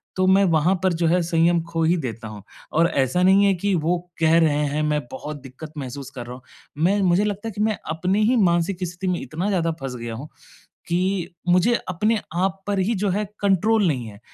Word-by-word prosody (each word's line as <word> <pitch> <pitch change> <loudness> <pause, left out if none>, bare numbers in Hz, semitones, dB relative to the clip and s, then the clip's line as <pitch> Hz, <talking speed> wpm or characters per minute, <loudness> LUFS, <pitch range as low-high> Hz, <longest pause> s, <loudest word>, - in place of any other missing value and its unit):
तो 185 - +1
मैं 195 +1 +5
वहाँ 170 +1 +3
पर 185 -2 +3
जो 165 0 0
है 180 +2 +3
संयम 170 0 +2
खो 165 -1 0
ही 170 +2 +3
देता 115 -5 -5
हूँ। 105 -2 -10 0.3
और 165 +2 +4
ऐसा 140 +5 +1
नहीं 195 +2 +5
है 200 - +4
कि 200 +2 -1
वो 170 +2 +1 0.2
कह 160 0 +4
रहे 160 -3 +3
हैं, 150 +2 -1
मैं 150 -1 +1
बहुत 150 +3 -6
दिक्कत 140 +4 -11
महसूस 135 -1 -6
कर 120 -2 -6
रहा 125 - -7
हूँ। 130 - -13 0.4
मैं 200 +4 +3
मुझे 185 +2 +3
लगता 210 +2 -3
है - - -6
कि 205 +1 -5
मैं 215 -1 +1
अपनी 185 +6 0
ही 250 +3 +3
मानसिक 175 -1 +1
स्थिति 180 +2 -6
में 180 -1 0
इतना 170 +6 -4
ज़्यादा 170 -4 +1
फँस 130 -2 -4
गया 115 -1 -6
हूँ 140 +7 -8 0.6
कि 180 +1 0 0.2
मुझे 180 +7 +4 0.2
अपने 210 +5 +1 0.2
आप 195 +1 -1
पर 200 -1 0
ही 205 +5 +1
जो 205 - +1
है 205 +3 0 0.2
कंट्रोल 205 +2 +2
नहीं 130 -7 -1
है। 100 -2 -11
175 Hz, 225 wpm, -23 LUFS, 155-195 Hz, 0.6 s, मैं